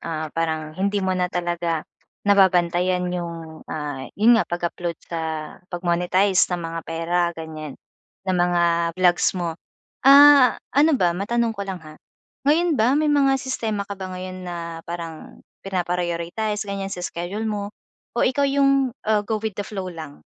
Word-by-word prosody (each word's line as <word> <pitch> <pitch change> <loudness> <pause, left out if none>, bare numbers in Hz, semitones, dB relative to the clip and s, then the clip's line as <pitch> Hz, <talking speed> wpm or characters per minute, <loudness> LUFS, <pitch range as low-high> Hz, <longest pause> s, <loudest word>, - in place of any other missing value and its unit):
ah, 155 -2 -4
parang 160 -2 -2
hindi 200 +4 -1
mo 185 - +1
na 180 -1 0
talaga 175 -2 -2 0.4
nababantayan 180 -2 +3
yung, 165 -2 -6
ah, 145 -3 -5
'yon 220 +4 +6
nga, - - -3
pag-upload 175 -1 -3
sa 165 -1 -4 0.5
pag-monetize 180 +2 +2
ng 180 - -1
mga 165 0 -4
pera 165 +2 -1 0.2
ganiyan, 155 -3 -7 0.5
ng 185 -1 0
mga 175 -1 +2 0.3
vlogs 180 -1 +3
mo. 170 -2 -2 0.5
Ah, 280 -1 +8 0.2
ano 290 +1 +4
ba, 175 -5 +2
matanong 230 +5 0
ko 200 -2 -6
lang, 190 - -3
ha, 155 0 -13 0.5
ngayon 320 -4 +3
ba 250 +6 +4
may 300 -1 +2
mga 275 -2 +4
sistema 225 -6 -3
ka 200 - -7
ba 190 -1 -6
ngayon 185 0 -7
na 170 -2 -6
parang 170 -2 -8 0.2
pina-prioritize 180 +3 -2
ganiyan, 200 -1 -4
sa 180 -2 -5
schedule 180 +7 -4
mo? 210 -1 -4 0.4
O - - +3
ikaw 280 +2 +2
yung, 275 -2 +2
ah, 215 -1 +2
go 215 +1 -2
with 220 0 -3
the 205 +1 -5
flow 190 -3 -5
lang? 150 - -10
185 Hz, 155 wpm, -23 LUFS, 170-215 Hz, 0.5 s, Ah